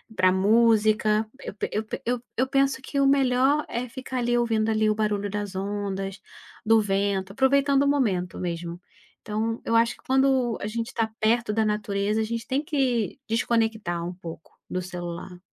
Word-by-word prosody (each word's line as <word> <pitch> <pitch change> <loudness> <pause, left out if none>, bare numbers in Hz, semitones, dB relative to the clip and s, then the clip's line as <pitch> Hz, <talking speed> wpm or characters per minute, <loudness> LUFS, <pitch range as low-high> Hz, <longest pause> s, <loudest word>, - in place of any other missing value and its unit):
Pra 185 -1 +4
música, 215 +1 +3 0.2
eu - - -6
pe - - -2
eu 215 - 0
pe - - -5
eu 245 0 0 0.2
eu 255 - +3
penso 275 0 +2
que 280 +1 -3
o 275 - +4
melhor 270 +2 +3
é 245 +1 -3
ficar 260 +1 -5
ali 240 0 +1
ouvindo 225 -2 +1
ali 215 0 +2
o - - +3
barulho 210 -1 -1
das 205 -1 -4
ondas, 195 0 -3 0.4
do 225 +1 +5
vento, 195 -1 -1
aproveitando 275 +2 +3
o - - +1
momento 205 -11 0
mesmo. 170 -1 -4 0.4
Então, 225 +2 -2
eu 230 - +1
acho 230 +1 +3
que, - - -25
quando 265 -3 +2
a - - -2
gente 230 +1 -3
está 225 -2 -1
perto 225 0 +2
da 220 0 +2
natureza, 210 0 0
a - - +1
gente 230 +1 -4
tem 275 +3 0
que 265 -6 0
desconectar 225 -6 0
um 180 - -5
pouco 165 -3 -10
do 180 - -2
celular. 175 0 -7
220 Hz, 180 wpm, -25 LUFS, 200-245 Hz, 0.4 s, do